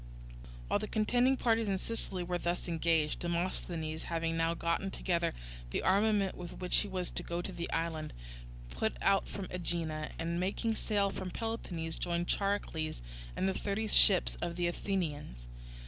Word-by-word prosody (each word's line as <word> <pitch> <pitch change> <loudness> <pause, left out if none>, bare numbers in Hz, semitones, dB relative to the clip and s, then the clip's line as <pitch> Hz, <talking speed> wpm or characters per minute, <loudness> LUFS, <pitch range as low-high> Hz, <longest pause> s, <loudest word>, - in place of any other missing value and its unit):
While - - +2
the 215 - -3
contending 245 +5 +3
parties 225 -2 +2
in 195 -1 +2
Sicily 190 -3 -3
were 175 0 -1
thus 175 +1 -1
engaged, 165 -2 +2
Demosthenes, 170 -2 -2
having 165 -1 -1
now 165 0 +2
got 170 0 +1
together 170 - 0 0.3
the - - -1
armament 200 0 +3
with 175 -1 -7
which 180 -1 +2
he 210 - +1
was 185 -2 -1
to - - -1
go 170 0 -3
to 175 - -3
the 170 -1 -4
island, 165 -2 -1 0.6
put - - -1
out 195 - +3
from 200 - -5
Aegina, 165 -3 -2
and 170 +1 -1
making 200 +5 0
sail 205 -2 +1
for 190 - -4
Peloponnese, 180 -7 -3
joined 175 0 -1
Charicles 165 - -1 0.3
and 190 - +1
the 190 - +2
thirty 205 +3 -1
ships 200 -2 +5
of 175 -1 -2
the 175 0 0
Athenians. 160 - -2
175 Hz, 165 wpm, -33 LUFS, 165-200 Hz, 0.6 s, ships